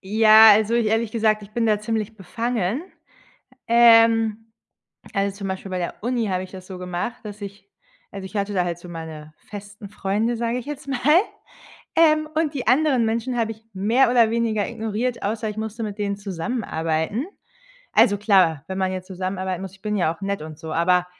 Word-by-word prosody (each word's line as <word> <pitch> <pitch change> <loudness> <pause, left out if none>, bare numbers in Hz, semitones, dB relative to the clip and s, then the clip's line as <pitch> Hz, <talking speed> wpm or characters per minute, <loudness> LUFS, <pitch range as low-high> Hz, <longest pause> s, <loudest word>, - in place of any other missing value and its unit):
ja, 220 +2 +7
also, 215 +2 +4
ich 235 -2 +2
ehrlich 225 0 0
gesagt, 215 -2 +1
ich 205 - -13
bin 230 0 0
da 210 -1 +2
ziemlich 220 0 -3
befangen, 230 - -2 0.9
ähm, 225 -1 +5 0.6
also, 200 0 -1
zum 200 -1 -5
Beispiel 190 0 -5
bei 185 - -2
der 175 - -4
Uni 235 0 -1
habe 185 -1 -1
ich 185 - -11
das 185 -1 -11
so 190 - -8
gemacht, 180 +6 -4
dass 210 0 -9
ich 200 - -9 0.5
also, 195 -1 -7
ich 190 - -11
hatte 200 0 -1
da 180 -2 +1
halt 170 -1 -3
so 175 0 -12
meine 160 -2 -8
festen 205 0 -10
Freunde, 210 +4 -1
sage 235 +1 -1
ich 250 - -6
jetzt 295 -1 -7
mal. 270 -3 -2 1.0
Ähm, 310 -1 +4
und 315 -2 0
die 260 - -4
anderen 265 -2 +3
Menschen 230 +3 -1
habe 225 -1 0
ich 220 0 -18
mehr 225 +7 +2
oder 230 -3 +4
weniger 225 -3 0
ignoriert, 225 +3 -3
außer 215 +1 -2
ich 210 - -6
musste 220 +1 -5
mit 210 -1 -5
denen 200 -1 -2
zusammenarbeiten. 195 - -2 0.7
Also, 205 -1 +4
klar, 185 -8 +3
wenn 190 - -4
man 190 -1 0
jetzt 185 0 -6
zusammenarbeiten 185 -1 -3
muss 190 - -7
ich 195 - -20
bin 210 -1 -2
ja 170 -4 +1
auch - - -23
nett 200 0 -2
und 155 -1 -9
so, 160 -1 -7
aber 180 +2 +2
210 Hz, 195 wpm, -22 LUFS, 190-230 Hz, 1.0 s, ja